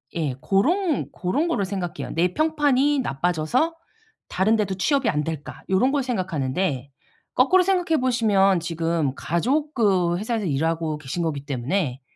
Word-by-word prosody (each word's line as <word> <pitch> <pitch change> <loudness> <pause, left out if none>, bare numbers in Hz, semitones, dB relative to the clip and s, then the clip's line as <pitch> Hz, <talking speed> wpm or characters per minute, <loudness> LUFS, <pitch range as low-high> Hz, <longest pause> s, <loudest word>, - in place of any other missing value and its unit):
예. 155 -5 -1
고런 315 - +1
고런 265 - -1
거를 265 - 0
생각해요. 185 -4 -4
'내 175 +2 +1
평판이 290 -2 +2
나빠져서 175 - 0 0.5
다른 195 +5 +2
데도 205 -3 -1
취업이 275 +7 +1
안 150 0 0
될까?' 155 -2 -6
요런 190 +8 +3
걸 285 -1 0
생각하는데 165 - -2 0.5
거꾸로 365 +9 +5
생각해 355 -4 +1
보시면 205 -7 +3
지금 165 -4 -1
가족 275 - -1
그 185 - +2
회사에서 220 +1 -2
일하고 160 +1 -1
계신 155 +4 -4
거기 145 -4 -3
때문에 140 +1 -2
190 Hz, 320 characters per minute, -23 LUFS, 160-260 Hz, 0.5 s, 거꾸로